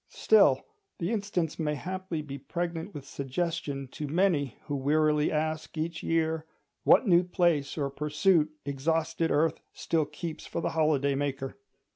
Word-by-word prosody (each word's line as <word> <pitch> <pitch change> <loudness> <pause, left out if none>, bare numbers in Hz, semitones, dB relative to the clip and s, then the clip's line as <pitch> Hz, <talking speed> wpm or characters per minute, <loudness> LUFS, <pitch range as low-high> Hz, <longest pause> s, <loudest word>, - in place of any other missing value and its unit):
Still, 440 - +4 0.3
the 170 +4 -2
instance 200 -8 -1
may 150 -2 0
haply 185 0 -4
be 140 -1 -7
pregnant 170 +4 -4
with 145 -5 -8
suggestion 140 0 -3
to 150 +3 -5
many 155 -4 +1
who 145 - -3
wearily 150 +2 +2
ask 155 +1 -2
each 160 +1 -2
year, 160 -1 0 0.4
what - - +6
new 175 -1 +6
place 175 -6 +1
or 140 -2 -1
pursuit 150 +3 +2 0.2
exhausted 160 +3 0
earth 160 +2 +2
still 160 -2 0
keeps 155 +2 -7
for - - -3
the - - -1
holiday 150 -3 +2
maker. 135 -1 -2
155 Hz, 145 wpm, -29 LUFS, 145-170 Hz, 0.4 s, what